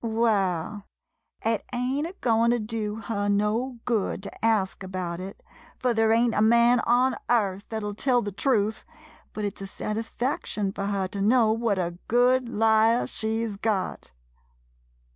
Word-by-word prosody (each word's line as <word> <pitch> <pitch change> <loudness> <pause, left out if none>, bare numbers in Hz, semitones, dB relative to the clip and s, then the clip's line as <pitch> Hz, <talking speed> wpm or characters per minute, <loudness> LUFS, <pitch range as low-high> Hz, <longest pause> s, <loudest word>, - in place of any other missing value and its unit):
Waal, 210 -4 0 0.6
it 225 -1 +1
ain't 255 +5 -1
a 350 - -9
goin' 230 -1 +3
to 240 - +3
do 215 -1 -3
her 215 -2 -3
no 215 +5 0
good 215 -4 -1
to 200 - -10
ask 215 -5 +1
about 185 -2 -4
it, 190 +2 -8 0.3
fur 250 -1 +1
there 225 -1 +3
ain't 230 +1 +3
a 210 - +1
man 235 +2 +5
on 250 +2 +3
earth 200 -4 +1
thet 220 -1 -4
'11 205 -1 -4
tell 250 -2 +2
the 205 - -4
truth, 220 0 0 0.5
but 210 - -4
it 200 - -5
's - - -11
a 195 - -5
sat 210 +2 -4
isfaction 225 -3 -2
fur 200 -1 -3
her 195 -2 -1
to 200 +1 -5
know 225 +1 +4
what 225 -2 0
a 175 -1 -3
good 245 +1 +3
liar 220 +2 +3
she 220 +1 -2
's 210 -3 -5
got 205 - -2
220 Hz, 170 wpm, -26 LUFS, 200-235 Hz, 0.6 s, man